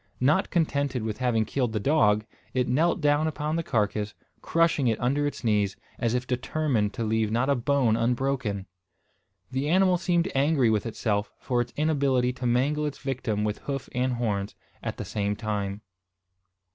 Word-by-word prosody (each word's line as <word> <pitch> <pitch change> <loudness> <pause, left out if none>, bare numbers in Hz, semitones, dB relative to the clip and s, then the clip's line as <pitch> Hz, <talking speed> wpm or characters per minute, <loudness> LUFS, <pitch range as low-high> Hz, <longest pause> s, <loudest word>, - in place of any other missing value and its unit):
Not 150 +9 +3
contented 140 - 0
with 110 0 -3
having 120 -4 +1
killed 125 -3 -1
the 110 - 0
dog, 105 -5 +3 0.3
it 125 -1 +2
knelt 160 +8 +2
down 145 +1 +3
upon 150 0 -2
the 165 - +1
carcass, 105 -6 -1 0.3
crushing 165 -5 +2
it 115 - +1
under 140 +4 +1
its 145 - -6
knees, 105 -3 +1 0.2
as 115 0 +1
if 125 0 -1
determined 125 -3 0
to 115 - -2
leave 110 0 +1
not 120 +5 +1
a - - +3
bone 125 -2 +2
unbroken! 120 -4 0 0.9
The 135 +3 -1
animal 185 0 +4
seemed 175 0 +1
angry 135 -3 +3
with 110 +1 0
itself 105 -2 -1
for 125 -2 0
its 120 0 -4
inability 140 -5 +2
to 125 0 -3
mangle 145 +5 +1
its 145 - -5
victim 120 -6 -2
with 105 -1 -1
hoof 135 -2 -4
and 125 +1 0
horns, 105 -4 -2 0.3
at - - -4
the - - -5
same 105 -1 -1
time. 105 -2 -3
125 Hz, 170 wpm, -27 LUFS, 110-145 Hz, 0.9 s, animal